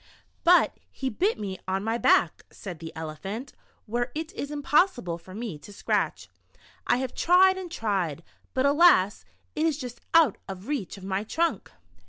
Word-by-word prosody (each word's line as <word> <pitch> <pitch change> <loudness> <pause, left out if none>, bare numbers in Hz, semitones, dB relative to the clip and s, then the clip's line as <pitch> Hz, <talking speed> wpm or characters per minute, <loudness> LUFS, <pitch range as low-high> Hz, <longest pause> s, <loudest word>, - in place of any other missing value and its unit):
"But 355 +1 +5
he 265 -1 -4
bit 390 - +1
me 195 -3 -5
on 190 +1 -1
my 225 +2 -1
back," 170 -6 +3
said 180 -5 -9
the 165 0 -7
Ele 160 -1 -5
phant, 215 - -6 0.3
"where 240 +2 -2
it 320 +4 -4
is 285 - -5
impossible 285 - +1
for 185 +3 -12
me 215 -9 -5
to 175 - -13
scratch. 200 - -1 0.6
I 245 - +3
have 255 -1 -3
tried 375 +2 +5
and 370 -2 -7
tried, 190 - -2 0.3
but 260 +1 +2
alas, 280 - +4 0.3
it 315 +2 +2
is 310 -3 0
just 250 -4 -8
out 315 -10 +5
of 190 +2 -8
reach 270 -11 -3
of 195 - -12
my 195 +1 -2
trunk. 330 +9 -1
240 Hz, 175 wpm, -27 LUFS, 190-300 Hz, 0.6 s, But